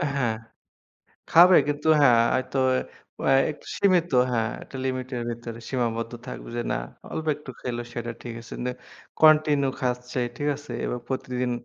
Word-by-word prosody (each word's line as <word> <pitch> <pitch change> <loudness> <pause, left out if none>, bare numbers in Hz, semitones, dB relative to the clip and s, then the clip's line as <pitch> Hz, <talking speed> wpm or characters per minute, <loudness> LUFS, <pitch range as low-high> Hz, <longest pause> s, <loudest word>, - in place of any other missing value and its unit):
হ্যাঁ। 120 -5 +1 1.0
খাবে 175 +2 +8
কিন্তু 145 +1 -1
হ্যাঁ, 125 -5 +6 0.2
হয়তো 130 +1 -1 0.6
অ্যা - - +3 0.2
একটু 150 - -11
সীমিত। 180 -4 +3 0.2
হ্যাঁ, 115 -2 +1
একটা 135 - -10
লিমিটের 130 -1 -3
ভেতরে 115 0 -7
সীমাবদ্ধ 115 -2 -2
থাকবে 125 - -7
যে 120 - 0
না, - - 0 0.4
অল্প 160 0 -4
একটু 150 -3 -10
খেলে 120 -1 -3
সেটা 120 0 -4
ঠিক 120 -2 -6
আছে। 115 - -14
কিন্তু 125 +1 -2 0.5
কন্টিনিউ 150 -3 +5
খাচ্ছে, 125 -1 -2 0.2
ঠিক 145 +2 -1
আছে? 145 0 -10
এবং 125 - -2
প্রতিদিন 125 -1 -2
130 Hz, 150 wpm, -25 LUFS, 120-145 Hz, 1.0 s, খাবে